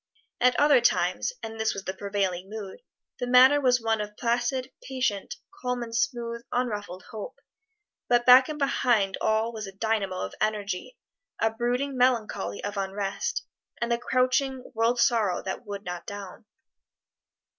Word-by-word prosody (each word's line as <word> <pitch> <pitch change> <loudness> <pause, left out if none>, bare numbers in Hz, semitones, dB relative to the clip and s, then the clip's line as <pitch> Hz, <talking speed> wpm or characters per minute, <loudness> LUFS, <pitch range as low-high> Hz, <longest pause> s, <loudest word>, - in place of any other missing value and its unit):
At 250 0 +3
other 290 -4 +6
times 240 - +2
and 225 0 -6
this 220 - 0
was 195 - -5
the 190 - -3
prevailing 195 -2 -2
mood 210 - -7 0.4
the 245 - -2
manner 260 +4 +7
was 250 -2 +4
one 225 -1 0
of 210 0 -7
placid, 245 +2 0
patient, 255 -7 -2 0.3
calm 250 -1 -1
and 230 -1 -7
smooth, 235 -2 -1
unruffled 205 -7 -2
hope; 215 -2 -7 0.7
but 240 0 +3
back 255 +2 +8
and 305 - -4
behind 240 -8 +2
all 220 +2 +1
was 215 -2 -5
a - - -7
dynamo 200 -2 -1
of 95 - -4
energy, 210 - -2 0.4
a 225 - +2
brooding 245 +4 -1
melancholy 240 -6 0
of 205 0 -4
unrest, 195 - -2 0.3
and 235 0 -1
the 235 - +2
crouching 255 +1 0
world 230 +2 +1
sorrow 220 -6 +2
that 190 +4 -5
would 200 0 -5
not 180 -2 -6
down. 200 -1 -8
230 Hz, 155 wpm, -27 LUFS, 205-250 Hz, 0.7 s, back